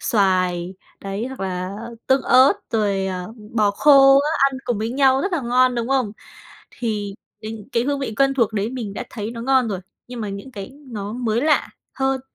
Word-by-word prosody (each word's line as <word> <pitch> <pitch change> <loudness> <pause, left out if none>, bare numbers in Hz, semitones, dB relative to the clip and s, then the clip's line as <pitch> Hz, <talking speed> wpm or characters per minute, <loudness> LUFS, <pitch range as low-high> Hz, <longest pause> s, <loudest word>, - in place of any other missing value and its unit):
xoài 185 -3 +1 0.3
đấy, 200 +4 -4
hoặc 265 -4 -8
là 185 0 -3 0.3
tương 265 0 +3
ớt 260 +2 +6 0.2
rồi, 200 -3 0
ờ, 185 +2 -5 0.2
bò 210 -2 +3
khô 275 +3 +6
á, 300 +2 -1 0.2
ăn 260 - -6
cùng 235 -4 -1
với 220 +2 -2
nhau 265 0 +3
rất 390 +1 -2
là 340 - 0
ngon, 250 +1 +3
đúng 235 0 -2
không? 260 -6 +1 0.6
Thì 210 -4 -3 0.3
đình 220 +1 -8
cái 235 - +2
hương 285 0 0
vị 225 -6 -3
quen 275 +1 +3
thuộc 230 -4 +1
đấy 210 +2 -1
mình 230 -6 -5
đã - - -4
thấy 215 -1 -5
nó 230 -1 -7
ngon 260 -2 +3
rồi, 195 -3 -2 0.3
nhưng 245 -2 -7
mà 210 - -3
những 200 +6 -7
cái 200 +1 -7 0.2
nó 210 -3 -5
mới 235 -1 -1
lạ 300 +1 +2 0.3
hơn 265 0 0
230 Hz, 205 wpm, -21 LUFS, 200-265 Hz, 0.6 s, ớt